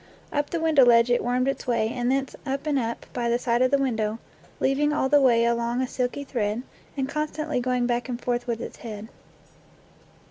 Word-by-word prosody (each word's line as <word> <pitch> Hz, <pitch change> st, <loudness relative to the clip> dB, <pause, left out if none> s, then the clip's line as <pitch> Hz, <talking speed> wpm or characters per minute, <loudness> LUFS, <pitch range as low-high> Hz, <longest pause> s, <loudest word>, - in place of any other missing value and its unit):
Up 290 Hz, 0 st, 0 dB
the 335 Hz, -, -2 dB
window 320 Hz, -4 st, +5 dB
ledge 235 Hz, 0 st, +5 dB
it 240 Hz, -, +2 dB
wormed 250 Hz, +2 st, +1 dB
its 275 Hz, -, -2 dB
way, 230 Hz, -3 st, +1 dB
and 245 Hz, +1 st, -1 dB
thence 270 Hz, 0 st, -1 dB
up 275 Hz, +1 st, -3 dB
and 290 Hz, -3 st, +1 dB
up, 230 Hz, -1 st, -4 dB
by 240 Hz, -1 st, -1 dB
the 235 Hz, -, +2 dB
side 240 Hz, 0 st, 0 dB
of 255 Hz, -, +4 dB
the 280 Hz, -, +3 dB
window, 225 Hz, -5 st, -1 dB, 0.4 s
leaving 285 Hz, +3 st, +2 dB
all 295 Hz, -3 st, +1 dB
the 290 Hz, 0 st, +5 dB
way 235 Hz, -3 st, +4 dB
along 235 Hz, +1 st, 0 dB
a 260 Hz, -, 0 dB
silky 250 Hz, +3 st, -2 dB
thread, 230 Hz, -3 st, -2 dB, 0.3 s
and 265 Hz, -1 st, 0 dB
constantly 305 Hz, 0 st, -2 dB
going 250 Hz, 0 st, 0 dB
back 240 Hz, +1 st, -1 dB
and 240 Hz, -1 st, -3 dB
forth 245 Hz, 0 st, -2 dB
with 230 Hz, -1 st, -2 dB
its -, -, -7 dB
head. 220 Hz, -1 st, -8 dB
245 Hz, 210 wpm, -25 LUFS, 235-275 Hz, 0.4 s, window